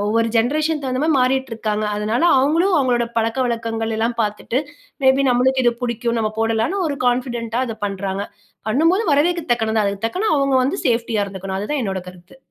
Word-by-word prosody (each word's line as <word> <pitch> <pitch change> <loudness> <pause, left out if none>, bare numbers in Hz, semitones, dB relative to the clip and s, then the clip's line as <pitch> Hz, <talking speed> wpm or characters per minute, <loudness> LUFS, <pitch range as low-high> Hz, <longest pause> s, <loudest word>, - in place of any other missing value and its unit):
ஒவ்வொரு 230 +2 +1
ஜென்ரேஷன் 300 +6 +1
தகுந்த 255 0 -1
மாரி 320 - +2
மாறிட்டுருக்காங்க. 230 -5 0
அதனால 215 +6 -1 0.2
அவங்களும் 330 +8 +2
அவங்களோட 245 -3 +2
பழக்கவழக்கங்கள் 225 -1 -1
எல்லாம் 230 +1 -1
பார்த்துட்டு 210 +4 -2 0.5
மே 265 - +7
பி 275 - +3
நம்மளுக்கு 260 +1 +2
இது 240 - +4
புடிக்கும் 235 -1 -1
நம்ம 215 -1 0
போடலான்னு 225 - 0
ஒரு 285 - -3
கான்ஃபிடென்ட்டா 240 -1 -1
அத 225 -2 -5
பண்றாங்க. 195 0 -3 0.4
பண்ணும்போது 330 - +3
வரவேற்க 340 +3 +2
தக்கனது 220 -2 0
அதுக்கு 200 +1 -3
தக்கன 370 - -1
அவங்க 275 -1 +1
வந்து 290 +9 -1
சேஃப்டியா 230 -3 +1
இருந்துக்கணும் 190 -1 -5
அதுதான் 265 +8 -2
என்னோட 190 -2 -2
கருத்து. 180 +4 -15
235 Hz, 165 wpm, -20 LUFS, 220-265 Hz, 0.5 s, மே